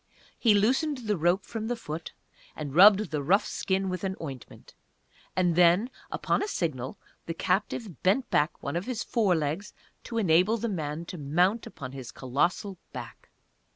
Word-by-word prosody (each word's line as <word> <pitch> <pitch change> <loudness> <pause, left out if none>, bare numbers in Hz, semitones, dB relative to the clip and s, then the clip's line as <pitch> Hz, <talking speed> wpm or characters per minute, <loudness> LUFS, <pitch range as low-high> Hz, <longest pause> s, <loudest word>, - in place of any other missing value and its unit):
He 220 -4 +5
loosened 255 +5 +1
the 210 -1 +1
rope 175 +3 +1
from 220 -1 -4
the 245 - -1
foot, 165 -7 -6 0.4
and 145 -3 -5
rubbed 205 +5 +7
the 150 -2 -1
rough 185 +9 +3
skin 190 0 -1
with 185 -1 -3
an 190 -1 -1
ointment, 135 -6 -9 0.6
and 180 -2 +2
then, 180 +8 +4 0.2
upon - - 0
a 410 - -1
signal, 140 - -3 0.3
the 165 - -3
captive 190 - -1
bent 205 +8 +2
back 150 +3 +1
one 140 - -3
of 175 +5 -2
his 245 -3 -2
fore 210 -7 +2
legs 160 +6 -2 0.3
to 230 - -4
enable 185 +2 +4
the 230 +1 -2
man 160 -3 -3
to 175 0 -7
mount 175 +10 +1
upon 130 -4 -8
his 130 -3 -8
colossal 170 - -1
back. - - -9
185 Hz, 170 wpm, -28 LUFS, 155-210 Hz, 0.6 s, rubbed